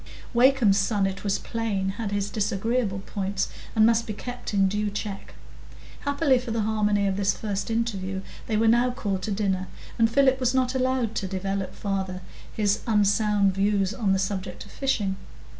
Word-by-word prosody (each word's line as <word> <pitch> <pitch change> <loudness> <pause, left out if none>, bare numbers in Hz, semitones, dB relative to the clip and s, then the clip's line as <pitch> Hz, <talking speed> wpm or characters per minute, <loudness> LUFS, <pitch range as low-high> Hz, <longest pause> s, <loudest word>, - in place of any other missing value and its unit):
Wakem's 240 -5 +5
son, 195 0 +1
it 195 0 -3
was 200 -1 +1
plain, 210 -4 -2
had 220 -4 -3
his 205 0 -1
disagreeable 210 0 -1
points, 195 -1 -2 0.3
and 220 -1 +6
must 230 0 +3
be 215 - -3
kept 245 +4 -6
in 195 -2 +3
due 210 +2 -1
check. 205 -1 -6 0.6
Happily 285 -2 +2
for 245 -1 -7
the 225 -1 0
harmony 210 -1 +1
of 195 -1 0
this 200 0 +1
first 205 -1 -3
interview, 195 -5 -2 0.2
they 220 - 0
were 225 +1 +3
now 240 +2 +4
called 200 -6 -2
to 215 - -3
dinner, 190 -2 0 0.3
and 225 0 +5
Philip 265 +2 +3
was 255 0 +1
not 255 -1 +2
allowed 255 -3 0
to 195 - -2
develop 195 0 -3
farther 190 -2 -3 0.3
his 205 -1 +1
unsound 205 -2 +3
views 195 0 +1
on 200 -1 0
the 190 - +3
subject 190 -1 -3
of 200 - -15
fishing. 210 -8 -1
205 Hz, 175 wpm, -26 LUFS, 195-230 Hz, 0.6 s, and